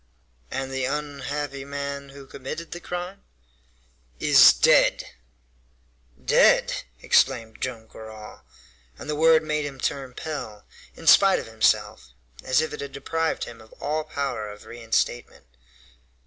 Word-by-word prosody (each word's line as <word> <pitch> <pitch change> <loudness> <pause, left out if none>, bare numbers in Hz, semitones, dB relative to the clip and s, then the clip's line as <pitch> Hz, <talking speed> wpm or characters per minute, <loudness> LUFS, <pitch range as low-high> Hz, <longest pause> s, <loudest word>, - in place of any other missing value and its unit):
"And 135 0 -4
the 135 -1 -2
unhappy 145 0 -4
man 140 0 -5
who 140 0 -12
committed 140 +5 -8
the 175 - -6
crime?" 180 +2 -6 1.0
"Is - - +8
dead." - - +4 1.2
"Dead!" - - +3 0.2
exclaimed 110 -1 +1
Joam 120 -3 -4
Garral; 110 -1 -11 0.6
and - - -10
the 150 - -2
word 160 +1 +5
made 150 -1 -1
him 140 -2 -7
turn 130 -1 -3
pale, 125 -10 -6 0.3
in - - -12
spite - - +7
of - - -5
himself, - - 0 0.3
as 130 +3 +2
if 160 - -3
it - - -6
had 140 -1 -7
deprived 160 +4 -2
him 115 -1 -9
of 110 - -17
all 155 +1 -3
power 140 -8 -4
of 105 0 -12
reinstatement. 120 - -2
140 Hz, 135 wpm, -24 LUFS, 120-150 Hz, 1.2 s, Is